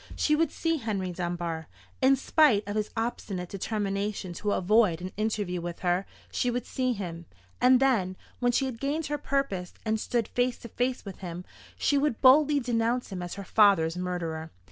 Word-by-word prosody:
She 300 - +2
would 320 -1 +1
see 330 -1 0
Henry 200 -8 -2
Dunbar. 170 -2 -3 0.3
In 265 +1 +6
spite 265 -6 +3
of 205 - -3
his 215 -1 -1
obstinate 200 -6 -3
determination 200 -2 -2
to 205 +4 -1
avoid 190 -3 +3
an 185 +1 -6
interview 205 -4 -1
with 170 0 -6
her, 180 +1 +1 0.2
she 250 - 0
would 245 0 -2
see 255 -1 0
him: 170 -5 -6 0.3
and 255 0 +6
then, 210 -9 +2 0.2
when 245 -1 +2
she 270 +3 +1
had 250 -4 -5
gained 295 +3 -1
her 295 0 -2
purpose, 205 -11 -2
and 220 0 +1
stood 235 0 -1
face 245 0 0
to 235 - -10
face 250 +2 -1
with 195 - -8
him, 180 -1 -6 0.3
she 285 - +2
would 280 -5 0
boldly 285 +2 +6
denounce 240 -1 0
him 185 -2 -4
as 175 0 -5
her 200 - -6
father's 190 -6 +4
murderer. 170 -3 -3
215 Hz, 185 wpm, -28 LUFS, 180-250 Hz, 0.3 s, In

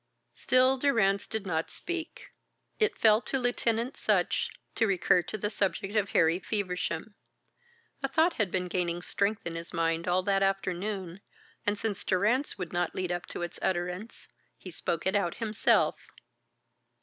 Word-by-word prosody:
Still 255 +1 +3
Durrance 215 -8 +2
did 220 -2 -4
not 165 -3 -1
speak. 345 -2 -6 0.5
It 430 -1 +2
fell 215 0 +5
to 270 - -1
Lieutenant 245 0 0
Sutch - - +1 0.2
to 225 - +2
recur 180 -2 +3
to 175 +5 -5
the 210 +1 -2
subject 200 0 -1
of 205 -2 +2
Harry 165 +2 +3
Feversham. 185 -1 -2 0.9
A 275 - 0
thought 320 +5 +3
had 210 - +1
been 180 0 -1
gaining 175 -1 -1
strength 200 +3 -1
in 170 - -3
his 165 +1 -7
mind 165 0 0
all 180 +1 +2
that 195 0 +2
afternoon, 195 -1 -2 0.5
and 205 0 +2
since 205 -2 -2
Durrance 215 +9 +1
would 180 -3 -5
not 175 0 -1
lead 185 -1 -2
up 175 0 -3
to - - -5
its 175 - -5
utterance, 180 +4 -3 0.3
he 185 - -10
spoke 165 0 -3
it 190 +2 +1
out 185 -4 +1
himself. 220 -2 +2
195 Hz, 160 wpm, -29 LUFS, 175-220 Hz, 0.9 s, fell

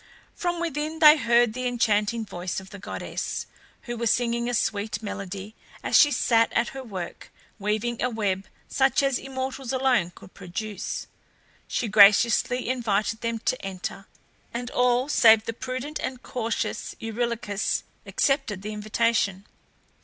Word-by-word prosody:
From 350 -1 -2
within 315 -1 -2
they 305 -1 +9
heard 235 -5 +3
the 255 +1 -2
enchanting 225 -1 +1
voice 180 -2 -4
of 190 0 -13
the 200 - -9
goddess, - - -4 0.4
who 240 -2 -5
was 235 -1 0
singing 235 0 0
a - - -2
sweet 215 0 -1
melody 200 0 -6 0.3
as - - 0
she 290 - +8
sat 230 -5 +3
at 235 +1 +1
her 270 - -7
work, 190 -7 -7 0.3
weaving 215 +3 -1
a 250 - +1
web 200 -4 -2 0.2
such 265 0 +2
as 275 -2 +1
immortals 265 -1 -4
alone 255 -9 +2
could - - -15
produce. 200 +3 -5 0.6
She 240 - -1
graciously 215 +4 +5
invited 225 -3 0
them 230 0 -1
to 255 - 0
enter, 195 +1 -6 0.4
and 245 +1 -5
all 250 +1 +2
save 225 -6 +6
the 230 - -3
prudent 255 +5 -5
and 255 -1 -5
cautious 230 -2 -3
Eurylochus 225 -2 -2 0.2
accepted 270 -9 0
the 215 +1 -4
invitation. 210 -2 0
230 Hz, 145 wpm, -25 LUFS, 210-255 Hz, 0.6 s, they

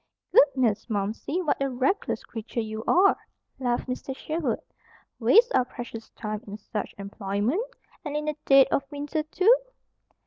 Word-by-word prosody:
"Goodness, 260 -7 +4
Momsey! 220 - -2
What 300 - 0
a 275 - +1
reckless 265 +11 0
creature 230 +1 -6
you 220 -1 -4
are," 385 +3 +5 0.4
laughed 245 -1 -1
Mr. 260 +1 -4
Sherwood. 310 -4 -2 0.6
"Waste 455 - +5
our - - +4
precious 240 -2 -8
time 215 -1 -5
in 205 +1 -6
such 215 0 -5
employment, 200 - -1 0.4
and 295 -2 -3
in 300 - -3
the 305 0 -1
dead 275 -1 +8
of - - +3
winter, 290 +1 -2
too?" 375 +9 +4
255 Hz, 145 wpm, -26 LUFS, 220-300 Hz, 0.6 s, dead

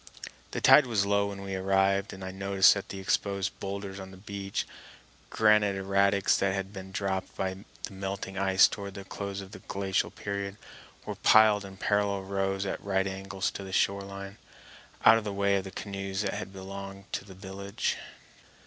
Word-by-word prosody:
The - - -4
tide 150 -3 +8
was 105 -4 +1
low 100 0 +2
when 100 -1 -6
we 95 0 -5
arrived, 95 +1 +2
and 95 0 -8
I 95 - -4
noticed 95 0 +5
that 100 - -6
the 95 - -6
exposed 100 0 -1
boulders 100 0 -5
on 95 0 -8
the 95 - -12
beach—granite 100 +1 -1
erratics 100 0 +3
that 95 0 +1
had 95 +1 -4
been 95 -1 -8
dropped 95 -1 -2
by 95 0 -2 0.3
the - - -5
melting 95 0 -4
ice 95 -1 +5
toward 100 -1 -6
the 100 - -6
close 100 0 -5
of 95 0 -11
the - - -9
glacial 95 -1 -1
period—were 100 0 -7
piled 110 -2 +6
in 95 -1 -10
parallel 100 -1 +1
rows 95 0 -1
at - - -4
right 95 -1 +1
angles 95 0 -3
to 100 - -7
the 95 - -8
shore 100 +1 +2
line, 100 +1 -8 0.7
out 115 +1 +9
of - - -8
the 105 - -3
way 100 0 +2
of 95 - -3
the - - -5
canoes 100 0 -4
that 100 - -1
had - - -5
belonged 100 0 -8
to - - -2
the 95 -1 -13
village. 100 +1 -3
100 Hz, 185 wpm, -29 LUFS, 95-100 Hz, 0.7 s, out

